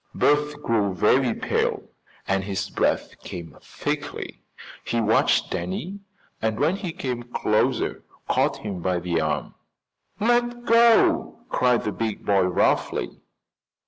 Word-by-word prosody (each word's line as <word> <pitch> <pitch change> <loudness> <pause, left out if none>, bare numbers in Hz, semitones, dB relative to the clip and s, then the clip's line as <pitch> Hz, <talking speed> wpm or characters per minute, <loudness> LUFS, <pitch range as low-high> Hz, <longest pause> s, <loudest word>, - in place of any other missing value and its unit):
Bert 150 0 +2
grew 105 -4 +1
very 125 +6 +3
pale - - -1 0.4
and 95 0 +1
his 95 -1 -3
breath - - -1
came 85 -4 -8
thickly. - - -5 0.4
He 120 - -1
watched 110 0 +2
Danny 95 - -4 0.4
and 110 0 -1
when 160 +7 +2
he 190 -4 -4
came 125 -6 -4
closer 115 -3 0 0.2
caught - - +1
him 95 -4 -4
by 90 0 0
the 85 -2 -1
arm. 80 - -2 0.7
"Let 240 +2 +1
go!" 230 0 +4
cried 125 -2 +2
the 105 - -1
big 110 0 -4
boy 100 -1 +3
roughly. 90 -8 0
115 Hz, 125 wpm, -24 LUFS, 95-150 Hz, 0.7 s, go